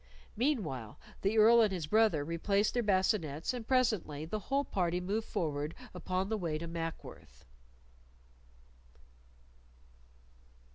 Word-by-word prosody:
Meanwhile 205 - -2 0.2
the 200 +3 +1
Earl 230 +2 +7
and 215 -3 +3
his 175 -5 -3
brother 205 -5 +3
replaced 200 +6 0
their 245 - +1
bascinets, 185 - 0
and 235 -3 -6
presently 215 - +1
the 210 +6 -3
whole 280 +1 +1
party 175 -2 0
moved 205 +5 -2
forward 155 -6 -2 0.2
upon 185 +1 -2
the 220 0 -2
way 165 -4 -2
to 165 - -6
Mackworth. 165 - -7
190 Hz, 115 wpm, -32 LUFS, 160-220 Hz, 0.2 s, Earl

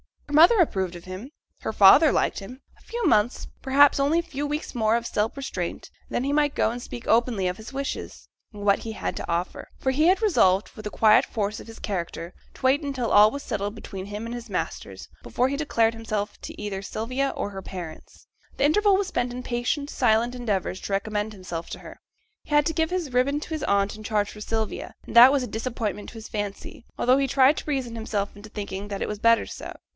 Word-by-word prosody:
Her 295 - -8
mother 340 +9 +7
approved 190 - +1
of 170 - -10
him, 185 +8 -8 0.3
her - - -4
father 215 +11 +7
liked - - +1
him. 250 +7 -10 0.2
A - - -23
few 475 0 -4
months, 215 +3 +2
perhaps 280 +1 +5
only 285 +4 +2
a - - +3
few 290 -3 -4
weeks 295 +1 -4
more 220 -2 +2
of 235 0 -1
self 215 -1 -1
restraint, 275 -1 -5 0.2
and - - -7
then 245 - +1
he 275 - -1
might 295 -1 +2
go - - +2
and 240 +1 -6
speak 240 -1 -8
openly 225 -4 +2
of 180 +1 -2
his 220 +4 -10
wishes, 275 0 -5 0.2
and 205 -2 -9
what 200 -1 +3
he 225 - -6
had - - -4
to - - -6
offer. 170 +2 -2
For 265 - 0
he 305 +5 +3
had 375 +3 +4
resolved, 200 - +3
with 215 - -11
the - - -2
quiet 215 +1 +5
force 215 -1 -3
of - - -11
his 225 - -11
character, 175 -3 -4 0.2
to - - -16
wait 265 +3 +3
until 270 -5 -2
all 210 +1 +7
was 280 +4 -6
finally - - -16
settled 205 -2 -2
between 190 -2 -7
him 205 +2 -6
and 230 - -5
his 240 -1 -7
masters, 190 - -5
before 250 +2 0
he 280 - -2
declared 230 -7 +1
himself 215 -2 -4
to - - -8
either 195 -2 -4
Sylvia 255 +7 -2
or - - -3
her 195 -1 -7
parents. 175 -4 -9 0.3
The - - -1
interval 400 +6 +4
was 400 -1 -1
spent 245 -5 -1
in 250 0 -6
patient, 250 +5 -2
silent 225 +3 +2
endeavours 205 -7 -2
to 200 - -4
recommend 210 +1 -1
himself 180 -4 -6
to - - -6
her. - - -12 0.5
He - - -16
had 295 0 +5
to 325 - -1
give 320 0 +1
his 350 -8 -3
ribbon 280 +4 +2
to - - -8
his 315 -3 -3
aunt 200 +1 +1
in 215 - -10
charge 210 -1 0
for 210 - -11
Sylvia, 220 0 -3
and - - -9
that 245 +3 +10
was 275 -3 +1
a - - -4
disappointment 220 -4 -4
to - - -14
his 225 -1 -9
fancy, 205 +2 -5
although 255 +2 +4
he 275 0 +1
tried 270 +3 +4
to - - -5
reason 260 -5 -2
himself 215 -3 -3
into 205 +1 -12
thinking 200 -1 -5
that 200 -1 -5
it - - -2
was 210 -1 -4
better 230 +1 +4
so. - - -8
230 Hz, 235 wpm, -25 LUFS, 205-275 Hz, 0.5 s, that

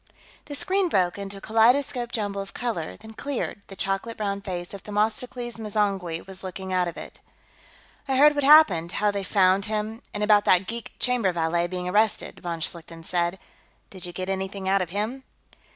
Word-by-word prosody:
The 290 - -6
screen 375 +5 +1
broke 185 - +1
into 200 0 -5
a - - -11
kaleidoscopic 240 +3 +3
jumble 205 -3 -2
of 195 - -9
color, 225 -10 -3
then 220 0 -12
cleared; 265 -5 -4
the 195 - -10
chocolate 195 +4 -2
brown 200 -2 -2
face 180 -2 -5
of 200 - -7
Themistocles 225 +3 -2
M'zangwe 200 -6 -1
was 190 0 -8
looking 190 0 -5
out 180 -1 +2
of 170 - -6
it. - - -9 0.9
"I 265 - +1
heard 295 +3 +7
what 290 -1 -1
happened, 215 - +6
how 210 0 +2
they 200 -1 -2
found 190 0 +3
him, 215 +1 -3
and 210 - -2
about 210 -1 +5
that 185 +1 +4
geek 230 +3 -6
chamber 245 -7 +1
valet 170 0 0
being 180 0 -4
arrested," 210 +3 +1
von 170 -2 -4
Schlichten 165 0 -5
said. 175 +2 0 0.5
"Did 185 -2 -7
you - - -6
get 185 +1 -5
anything 190 0 -3
out 195 0 +3
of 180 - -3
him?" 215 +8 -3
200 Hz, 185 wpm, -25 LUFS, 185-225 Hz, 0.9 s, heard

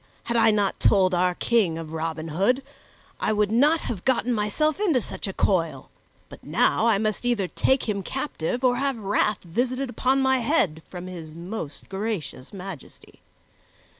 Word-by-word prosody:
Had 235 - -2
I 225 -1 +5
not 205 -2 +1
told 185 -3 +4
our 180 0 +2
King 205 -9 +1
of 160 -1 -7
Robin 160 0 -3
Hood, 200 - +1 0.6
I - - +1
would 210 -1 +1
not 295 +8 +4
have 200 -7 -5
gotten 250 -1 +1
myself 235 - 0
into 350 -11 +3
such 215 - -4
a - - -2
coil; 165 -8 0 0.4
but - - -13
now 225 - +2
I 220 -3 +4
must 215 +2 -1
either 235 -6 +1
take 265 +8 +1
him 200 -2 -1
captive 250 - -3
or 245 -1 +3
have 275 -1 0
wrath 210 0 0
visited 250 +8 -1
upon 260 +2 +1
my 265 -1 +3
head 225 - +1
from 180 -1 -7
his 165 -4 -8
most 170 -2 -6
gracious 195 - -4
Majesty. 190 -6 -10
210 Hz, 165 wpm, -25 LUFS, 180-250 Hz, 0.6 s, I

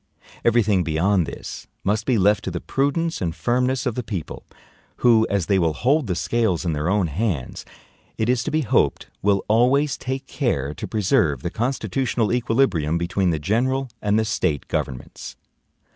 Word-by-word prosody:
Every 120 0 +4
thing 100 -3 +2
beyond 85 +2 +1
this - - -8 0.2
must 105 +3 0
be 125 -3 +3
left 105 +1 +3
to - - -1
the 90 -1 -4
prudence 150 - -1
and 85 -3 -2
firmness 125 +8 0
of 125 - 0
the 125 - -3
people; 100 -8 -6 0.6
who, 115 -2 +5
as 100 -4 0
they 95 +1 +2
will 80 -3 +1
hold 135 - +1
the 90 - -1
scales 100 -2 0
in 85 - 0
their 75 +3 -1
own 100 -1 +2
hands, 85 - -3 0.5
it 110 - 0
is 125 -1 +2
to - - -1
be 155 +1 +1
hoped, 120 - +1
will 100 -1 +1
always 130 +6 +3
take 130 +1 -4
care 75 - -1
to 75 - -6
preserve 95 - +1
the 85 - -2
constitutional 120 0 -1
equilibrium 115 - +1
between 90 +2 0
the 80 - +1
general 125 - 0
and 105 0 +2
the 110 - +2
State 90 - -1
governments. 65 -2 -5
105 Hz, 175 wpm, -22 LUFS, 85-125 Hz, 0.6 s, who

